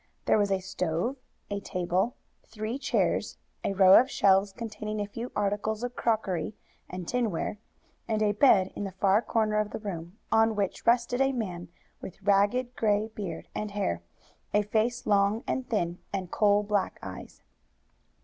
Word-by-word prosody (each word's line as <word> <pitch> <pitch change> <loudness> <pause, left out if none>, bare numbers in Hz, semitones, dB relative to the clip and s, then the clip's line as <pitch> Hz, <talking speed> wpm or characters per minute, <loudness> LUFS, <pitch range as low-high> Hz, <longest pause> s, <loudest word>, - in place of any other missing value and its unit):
There - - +4
was 205 -1 +2
a 195 - +2
stove, 185 +6 -2 0.3
a 200 - -1
table, 185 +3 -1 0.3
three 220 +4 -4
chairs, - - 0 0.3
a - - 0
row 190 -1 +7
of 260 - +1
shelves 195 -4 +3
containing 215 0 -5
a 205 - -1
few 230 +4 -6
articles 210 +2 -1
of 245 0 -4
crockery 210 -5 -1 0.3
and 180 -2 -6
tinware, 220 -4 -1 0.5
and 215 -1 +1
a 210 - +3
bed 205 -4 +4
in - - -4
the 195 -2 -5
far 195 +3 +3
corner 215 -2 +1
of 210 -1 0
the - - -5
room, 180 -3 -6
on 225 0 +4
which 200 +2 -2
rested 240 +2 +3
a 270 0 +3
man 180 -8 -4 0.3
with 190 - -9
ragged 205 +6 +2
gray 210 0 +1
beard 195 -7 -6
and 210 - -3
hair, 200 - -2 0.5
a 210 - +4
face 225 +4 0
long 205 +2 +2
and 260 -1 -2
thin, 175 -6 -1
and 185 -3 -4
coal 205 -1 +3
black 205 -2 -1
eyes. - - -9
210 Hz, 165 wpm, -28 LUFS, 195-225 Hz, 0.5 s, row